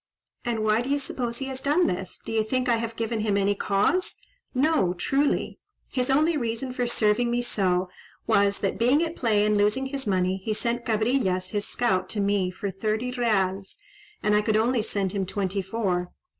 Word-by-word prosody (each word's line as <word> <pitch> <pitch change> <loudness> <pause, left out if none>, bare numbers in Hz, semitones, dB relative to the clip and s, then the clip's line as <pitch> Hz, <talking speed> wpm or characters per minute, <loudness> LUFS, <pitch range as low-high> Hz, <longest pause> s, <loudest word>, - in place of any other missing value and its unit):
"And 230 -3 -1
why 215 +1 +3
do 250 - -4
you 285 - +2
suppose 245 -4 -3
he 270 - -2
has 265 0 -5
done 295 +6 +3
this? 180 +1 -3
Do - - -5
you 220 -1 +2
think 255 +3 -1
I 235 -2 +3
have 230 0 -4
given 225 0 -2
him 210 -2 +1
any 200 0 +2
cause?—no, 275 - 0
truly. 280 +10 0 0.3
His 255 -1 -1
only 310 +5 +3
reason 245 -1 -2
for 245 -1 -1
serving 235 0 +2
me 240 +1 0
so 185 -5 +1 0.4
was, 200 0 +3
that 195 - -1
being 260 +7 +4
at 330 0 -3
play 215 -4 +2
and 210 -1 +2
losing 210 +6 +2
his 265 -2 -3
money, 185 -1 +1
he 215 +1 -1
sent 235 +2 -1
Cabrillas, 215 -5 +1
his 205 -2 -2
scout, 190 -7 0
to 215 - -2
me 200 -2 +1
for 190 +2 -4
thirty 215 +5 -2
reals, 200 - 0 0.5
and 210 0 +3
I 210 - +4
could 215 0 +1
only 235 +2 +2
send 200 -3 -1
him 195 -2 -2
twenty 195 0 -1
four. 185 -3 -2
220 Hz, 195 wpm, -26 LUFS, 200-250 Hz, 0.5 s, being